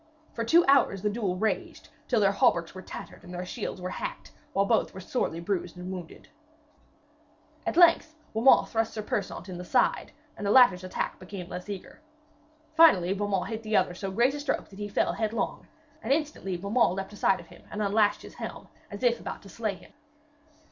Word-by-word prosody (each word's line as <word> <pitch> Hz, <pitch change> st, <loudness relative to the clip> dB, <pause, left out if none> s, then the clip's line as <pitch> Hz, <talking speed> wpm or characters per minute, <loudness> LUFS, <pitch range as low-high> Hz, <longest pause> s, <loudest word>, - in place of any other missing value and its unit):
For 230 Hz, -, -2 dB
two 335 Hz, +9 st, +5 dB
hours 265 Hz, -8 st, +4 dB
the 210 Hz, -, +1 dB
duel 205 Hz, -5 st, -1 dB
raged, 215 Hz, +4 st, -2 dB, 0.2 s
till 240 Hz, -, +2 dB
their 200 Hz, -2 st, +4 dB
hauberks 170 Hz, -4 st, +2 dB
were 185 Hz, -, -8 dB
tattered -, -, -10 dB
and 180 Hz, -, -11 dB
their 180 Hz, 0 st, -5 dB
shields 200 Hz, 0 st, -5 dB
were 180 Hz, 0 st, -4 dB
hacked, -, -, -6 dB, 0.2 s
while 195 Hz, -, +2 dB
both 220 Hz, -2 st, +1 dB
were -, -, -6 dB
sorely 185 Hz, -4 st, -2 dB
bruised 180 Hz, 0 st, -3 dB
and 180 Hz, +1 st, -6 dB
wounded. 180 Hz, -3 st, -8 dB, 1.4 s
At -, -, -1 dB
length 335 Hz, -2 st, +5 dB, 0.2 s
Beaumains 230 Hz, +4 st, +5 dB
thrust 225 Hz, -1 st, 0 dB
Sir 215 Hz, -, -3 dB
Persaunt 205 Hz, -3 st, -3 dB
in 180 Hz, -2 st, -7 dB
the -, -, -5 dB
side, -, -, +1 dB, 0.2 s
and -, -, -8 dB
the -, -, +1 dB
latter's 205 Hz, -7 st, +6 dB
attack 185 Hz, -, -3 dB
became 185 Hz, -1 st, -8 dB
less 180 Hz, +3 st, -6 dB
eager. 200 Hz, +8 st, -8 dB, 0.7 s
Finally 250 Hz, -, +6 dB
Beaumains 200 Hz, -2 st, -1 dB
hit 220 Hz, -1 st, -4 dB
the 215 Hz, -1 st, +1 dB
other 180 Hz, -1 st, +2 dB
so 195 Hz, +2 st, -5 dB
great 235 Hz, +7 st, +2 dB
a 290 Hz, -, -4 dB
stroke 285 Hz, -1 st, -2 dB
that 195 Hz, -, -13 dB
he 205 Hz, -, -3 dB
fell -, -, +1 dB
headlong, 220 Hz, -1 st, -2 dB, 0.3 s
and 230 Hz, -, -3 dB
instantly 285 Hz, -, -1 dB
Beaumains 200 Hz, +1 st, +1 dB
leaped 195 Hz, +1 st, -5 dB
astride 195 Hz, -1 st, +2 dB
of -, -, -11 dB
him -, -, -16 dB
and 210 Hz, -, -6 dB
unlashed 205 Hz, +1 st, +2 dB
his -, -, -11 dB
helm, -, -, -8 dB, 0.2 s
as 205 Hz, +2 st, -8 dB
if 240 Hz, -1 st, +3 dB
about -, -, -7 dB
to 200 Hz, -, -13 dB
slay 215 Hz, -1 st, -3 dB
him. -, -, -17 dB
205 Hz, 200 wpm, -28 LUFS, 185-230 Hz, 1.4 s, latter's